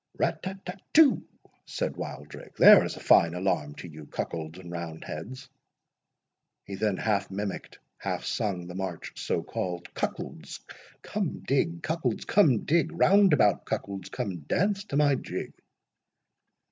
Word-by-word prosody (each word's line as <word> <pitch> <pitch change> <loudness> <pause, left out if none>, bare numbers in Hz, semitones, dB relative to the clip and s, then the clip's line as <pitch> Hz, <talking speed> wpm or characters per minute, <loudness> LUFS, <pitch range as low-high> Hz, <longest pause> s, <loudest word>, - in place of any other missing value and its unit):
"Rat - - 0
tat 190 +1 -7
tat 180 +1 -7
too!" 300 -4 +6 0.4
said - - -3
Wildrake; 75 0 -8
"there - - +9
is - - -4
a - - -9
fine 85 +1 +4
alarm 90 -6 -1
to - - -9
you 75 -2 -11
cuckolds 80 0 -5
and 90 -2 -10
round 85 -2 -6
heads." 125 - -7 1.2
He 100 - -8
then 100 0 0
half 100 -3 0
mimicked, 100 +1 -5 0.2
half - - -3
sung 95 -5 -2
the 90 - -8
march 95 -2 -5
so - - -1
called:— 90 -1 -5
"Cuckolds, - - -5 0.4
come 200 -5 -3
dig, 165 +5 0
cuckolds, 155 -8 -1
come 145 - +4
dig; 165 +1 +2
Round 195 +3 +5
about 105 -9 +3
cuckolds, 100 -2 -4
come 95 -4 -4
dance 195 - 0
to 140 - -2
my 145 -1 +4
jig!" 130 - -4
100 Hz, 145 wpm, -28 LUFS, -, 1.2 s, there